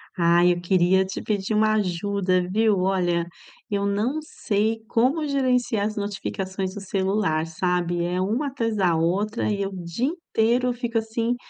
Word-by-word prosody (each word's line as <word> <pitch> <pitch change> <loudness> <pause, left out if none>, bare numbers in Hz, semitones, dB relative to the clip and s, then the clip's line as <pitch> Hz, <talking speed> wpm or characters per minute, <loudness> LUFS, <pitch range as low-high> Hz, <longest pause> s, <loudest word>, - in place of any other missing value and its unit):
Ah, 170 0 +4
eu 175 -1 +3
queria 185 +1 +3
te 190 - -6
pedir 205 0 -1
uma 215 0 +3
ajuda, 185 -2 0
viu, 215 +2 +2
olha, 175 -3 +1 0.4
eu 200 -2 -1
não 220 +9 0
sei 220 -6 -1
como 265 +8 +1
gerenciar 250 -6 +1
as 215 - -5
notificações 195 -2 -4
do - - -5
celular, 190 -4 0
sabe, 175 +1 -1
é 180 +1 -1
uma 225 +10 0
atrás 230 -5 -2
da 185 -5 +2
outra 200 +8 0
e 200 -1 -1
eu 195 - -2
o 185 -2 -7
dia 170 +9 -2
inteiro 250 -6 0
eu 250 - +1
fico, 235 -1 -1
assim, 230 +2 -1
200 Hz, 165 wpm, -24 LUFS, 180-225 Hz, 0.4 s, Ah